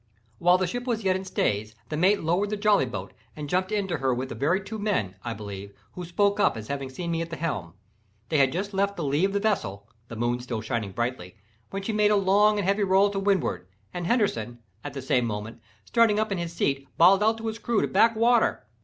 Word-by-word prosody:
While 180 Hz, +1 st, +5 dB
the 185 Hz, -, 0 dB
ship 245 Hz, +8 st, -4 dB
was 225 Hz, -3 st, -1 dB
yet 190 Hz, -1 st, +2 dB
in 190 Hz, 0 st, -4 dB
stays, 110 Hz, -, -1 dB
the 155 Hz, -, -3 dB
mate 190 Hz, +5 st, +3 dB
lowered 175 Hz, +6 st, +1 dB
the 210 Hz, -, -2 dB
jolly 205 Hz, -9 st, +3 dB
boat 100 Hz, -5 st, -6 dB, 0.2 s
and 150 Hz, -1 st, -6 dB
jumped 185 Hz, +4 st, 0 dB
into 195 Hz, -5 st, -1 dB
her 130 Hz, -2 st, 0 dB
with 130 Hz, +2 st, -4 dB
the -, -, -5 dB
very 160 Hz, +8 st, +1 dB
two 215 Hz, +3 st, -6 dB
men, 190 Hz, -, -1 dB
I 115 Hz, -2 st, -4 dB
believe, 100 Hz, -1 st, -8 dB, 0.2 s
who 180 Hz, -, -7 dB
spoke 200 Hz, +4 st, +1 dB
up 205 Hz, -, +3 dB
as 110 Hz, -1 st, -8 dB
having 140 Hz, -1 st, -3 dB
seen 170 Hz, +6 st, -5 dB
me 165 Hz, 0 st, -1 dB
at 165 Hz, -, -4 dB
the 165 Hz, -, -5 dB
helm. 115 Hz, -, -4 dB, 0.5 s
They 155 Hz, -, +2 dB
had 135 Hz, -1 st, +4 dB
just 200 Hz, +6 st, -3 dB
left 200 Hz, +1 st, 0 dB
the 170 Hz, -, -3 dB
lee 145 Hz, +5 st, +2 dB
of 195 Hz, -, 0 dB
the 200 Hz, -, +1 dB
vessel 105 Hz, -, -1 dB, 0.2 s
(the 115 Hz, -, -8 dB
moon 120 Hz, +2 st, -1 dB
still 125 Hz, -2 st, -4 dB
shining 110 Hz, -3 st, -3 dB
brightly) 120 Hz, -4 st, -3 dB, 0.3 s
when 195 Hz, 0 st, -5 dB
she 220 Hz, -, -2 dB
made 210 Hz, 0 st, +3 dB
a 210 Hz, -, +4 dB
long 205 Hz, +2 st, +4 dB
and 200 Hz, -3 st, -1 dB
heavy 200 Hz, +1 st, +2 dB
roll 195 Hz, +1 st, +4 dB
to 195 Hz, -, -2 dB
windward, 190 Hz, -, 0 dB, 0.3 s
and 175 Hz, -1 st, -3 dB
Henderson, 120 Hz, -, 0 dB, 0.3 s
at 145 Hz, -, -6 dB
the 135 Hz, -2 st, -6 dB
same 125 Hz, -2 st, +1 dB
moment, 110 Hz, +2 st, -6 dB, 0.2 s
starting 220 Hz, -, +3 dB
up 215 Hz, -1 st, -1 dB
in 195 Hz, -, -1 dB
his 170 Hz, -1 st, -4 dB
seat 140 Hz, -4 st, -1 dB
bawled 190 Hz, +4 st, +6 dB
out 220 Hz, +1 st, +3 dB
to 225 Hz, -, -8 dB
his 220 Hz, 0 st, -3 dB
crew 230 Hz, -2 st, 0 dB
to -, -, +1 dB
back 225 Hz, +4 st, +4 dB
water. 230 Hz, -, +2 dB
175 Hz, 245 wpm, -26 LUFS, 125-205 Hz, 0.5 s, bawled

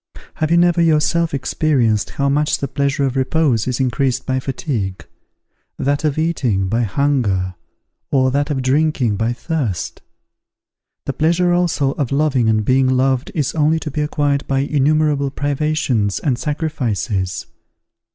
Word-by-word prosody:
Have 155 Hz, -, 0 dB
you 170 Hz, -, +4 dB
never 175 Hz, 0 st, +3 dB
yourself 165 Hz, +1 st, +2 dB
experienced 130 Hz, -6 st, 0 dB
how 140 Hz, -, +1 dB
much 150 Hz, +2 st, +1 dB
the 140 Hz, -, -3 dB
pleasure 140 Hz, +1 st, -1 dB
of 130 Hz, -1 st, -2 dB
repose 130 Hz, -3 st, +1 dB
is 125 Hz, 0 st, -1 dB
increased 130 Hz, 0 st, 0 dB
by 130 Hz, -1 st, 0 dB
fatigue; 115 Hz, -, -4 dB, 0.7 s
that 145 Hz, +2 st, 0 dB
of 150 Hz, -2 st, 0 dB
eating, 130 Hz, -, 0 dB
by 115 Hz, +4 st, +1 dB
hunger; 110 Hz, -7 st, 0 dB, 0.6 s
or 130 Hz, -2 st, +2 dB
that 145 Hz, +2 st, 0 dB
of 135 Hz, -3 st, -1 dB
drinking, 135 Hz, -4 st, +1 dB
by 115 Hz, +3 st, 0 dB
thirst? 120 Hz, -, -3 dB, 1.0 s
The 140 Hz, -, -2 dB
pleasure 170 Hz, +5 st, +2 dB
also 170 Hz, -6 st, +1 dB
of 140 Hz, -3 st, -3 dB
loving 140 Hz, -5 st, +2 dB
and 110 Hz, -1 st, +1 dB
being 130 Hz, +2 st, +3 dB
loved 130 Hz, 0 st, +1 dB
is 150 Hz, -5 st, 0 dB
only 155 Hz, +1 st, +2 dB
to 150 Hz, -, -5 dB
be 150 Hz, -, -2 dB
acquired 145 Hz, -1 st, 0 dB
by 135 Hz, -1 st, +1 dB
innumerable 145 Hz, 0 st, +1 dB
privations 140 Hz, -7 st, -1 dB
and 135 Hz, -4 st, 0 dB
sacrifices. 120 Hz, -, -2 dB
140 Hz, 145 wpm, -19 LUFS, 125-150 Hz, 1.0 s, you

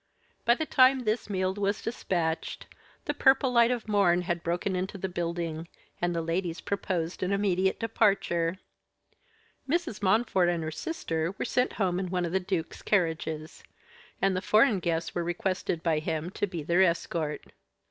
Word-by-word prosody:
By 235 Hz, -, +5 dB
the 315 Hz, -, -2 dB
time 260 Hz, -2 st, +5 dB
this 215 Hz, -1 st, -1 dB
meal 185 Hz, -1 st, 0 dB
was 200 Hz, +1 st, -1 dB
dispatched, 170 Hz, -7 st, -2 dB, 0.4 s
the 290 Hz, -, 0 dB
purple 265 Hz, -2 st, +4 dB
light 235 Hz, -1 st, +5 dB
of 240 Hz, -3 st, -2 dB
morn 185 Hz, -4 st, +3 dB
had 175 Hz, -1 st, -2 dB
broken 175 Hz, +3 st, -1 dB
into 185 Hz, +2 st, -3 dB
the 190 Hz, -, -3 dB
building, 170 Hz, -2 st, -3 dB, 0.3 s
and 175 Hz, 0 st, 0 dB
the 165 Hz, -, -1 dB
ladies 170 Hz, +1 st, -2 dB
proposed 180 Hz, -4 st, -2 dB
an 185 Hz, +1 st, 0 dB
immediate 190 Hz, -2 st, +1 dB
departure. 195 Hz, -6 st, +1 dB, 1.1 s
Mrs. 325 Hz, -, -1 dB
Montfort 190 Hz, -2 st, +3 dB
and 170 Hz, -2 st, -1 dB
her 155 Hz, -, -3 dB
sister 165 Hz, -, -3 dB
were -, -, -2 dB
sent 250 Hz, 0 st, +1 dB
home 185 Hz, -3 st, 0 dB
in 185 Hz, -1 st, -3 dB
one 180 Hz, -1 st, 0 dB
of 170 Hz, -, -3 dB
the 190 Hz, -, +2 dB
duke's 180 Hz, -3 st, -3 dB
carriages; 160 Hz, -5 st, -1 dB, 0.6 s
and 195 Hz, -1 st, +2 dB
the 185 Hz, -, -1 dB
foreign 215 Hz, 0 st, +4 dB
guests 165 Hz, -1 st, -2 dB
were 175 Hz, -, -1 dB
requested 175 Hz, -1 st, -2 dB
by 160 Hz, -3 st, +2 dB
him 160 Hz, +2 st, -3 dB
to 205 Hz, -, -1 dB
be 175 Hz, -5 st, -5 dB
their 170 Hz, +5 st, +3 dB
escort. 170 Hz, -4 st, 0 dB
185 Hz, 170 wpm, -28 LUFS, 170-205 Hz, 1.1 s, By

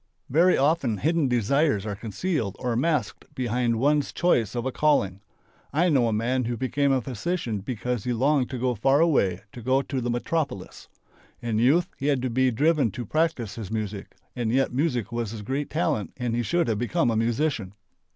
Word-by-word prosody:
Very 170 Hz, +6 st, +4 dB
often 140 Hz, -6 st, +2 dB
hidden 160 Hz, -, +1 dB
desires 125 Hz, -1 st, +1 dB
are 105 Hz, -2 st, -3 dB
concealed 115 Hz, -, -3 dB
or 125 Hz, -2 st, -2 dB
masked 140 Hz, -3 st, -1 dB
behind 120 Hz, -1 st, 0 dB
one's 145 Hz, +3 st, +2 dB
choice 125 Hz, -, +1 dB
of 120 Hz, 0 st, -2 dB
a 130 Hz, -, -1 dB
calling. 100 Hz, -11 st, +1 dB, 0.5 s
I 170 Hz, +6 st, +2 dB
know 130 Hz, -7 st, +3 dB
a -, -, 0 dB
man 120 Hz, +4 st, 0 dB
who 120 Hz, 0 st, -2 dB
became 140 Hz, +3 st, +1 dB
a 130 Hz, -2 st, +1 dB
physician 125 Hz, -, -3 dB
because 120 Hz, +1 st, -3 dB
he 125 Hz, -, -1 dB
longed 130 Hz, +2 st, +2 dB
to 130 Hz, -, -4 dB
go 125 Hz, +1 st, 0 dB
far 135 Hz, +6 st, +2 dB
away, 100 Hz, -, +2 dB
to 120 Hz, -, -9 dB
go 130 Hz, +3 st, +2 dB
to 135 Hz, -2 st, -3 dB
the 120 Hz, -, -2 dB
metropolis. 120 Hz, -, -3 dB, 0.5 s
In 115 Hz, -2 st, -1 dB
youth 155 Hz, +9 st, +4 dB
he 140 Hz, -, -2 dB
had 135 Hz, -4 st, +1 dB
to 130 Hz, -, -1 dB
be 130 Hz, +2 st, +3 dB
driven 145 Hz, +2 st, +2 dB
to 120 Hz, -1 st, -5 dB
practice 155 Hz, -7 st, 0 dB
his 110 Hz, -4 st, -7 dB
music 105 Hz, -2 st, -5 dB, 0.2 s
and 120 Hz, -3 st, -1 dB
yet 135 Hz, 0 st, +1 dB
music 125 Hz, -6 st, 0 dB
was 120 Hz, -2 st, -2 dB
his 105 Hz, -1 st, -7 dB
great 135 Hz, +6 st, -3 dB
talent 150 Hz, -, -1 dB
and 120 Hz, -2 st, -2 dB
he 120 Hz, -, +1 dB
should 170 Hz, +7 st, 0 dB
have 110 Hz, -3 st, 0 dB
become 120 Hz, +2 st, +1 dB
a -, -, -1 dB
musician. 115 Hz, -3 st, -1 dB
125 Hz, 195 wpm, -25 LUFS, 115-145 Hz, 0.5 s, Very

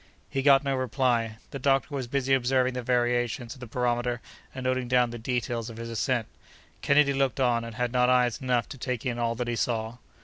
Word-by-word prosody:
He 135 Hz, -, 0 dB
got 140 Hz, 0 st, +6 dB
no 140 Hz, -1 st, 0 dB
reply. 120 Hz, -3 st, 0 dB
The 140 Hz, -, -5 dB
doctor 135 Hz, +2 st, +1 dB
was 135 Hz, -3 st, -3 dB
busy 135 Hz, +1 st, 0 dB
observing 130 Hz, 0 st, +2 dB
the 125 Hz, -, -3 dB
variations 120 Hz, -1 st, 0 dB
of 130 Hz, -, -15 dB
the 125 Hz, -, -8 dB
barometer 120 Hz, +1 st, -1 dB, 0.3 s
and 130 Hz, -, -7 dB
noting 130 Hz, -1 st, 0 dB
down 125 Hz, -1 st, +3 dB
the 120 Hz, -, -6 dB
details 120 Hz, -1 st, -2 dB
of 115 Hz, -, -9 dB
his 115 Hz, 0 st, -6 dB
ascent. 115 Hz, +1 st, 0 dB, 0.6 s
Kennedy 140 Hz, 0 st, +4 dB
looked 135 Hz, 0 st, 0 dB
on, 120 Hz, -3 st, +2 dB
and 115 Hz, -1 st, -8 dB
had 125 Hz, -1 st, -1 dB
not 125 Hz, 0 st, +3 dB
eyes 125 Hz, -1 st, +2 dB
enough 125 Hz, -2 st, +1 dB
to 135 Hz, -, -9 dB
take 125 Hz, -2 st, -3 dB
in 120 Hz, -1 st, -2 dB
all 115 Hz, 0 st, 0 dB
that 120 Hz, +1 st, -3 dB
he 120 Hz, -, -1 dB
saw. 115 Hz, 0 st, -2 dB
125 Hz, 215 wpm, -27 LUFS, 120-130 Hz, 0.6 s, got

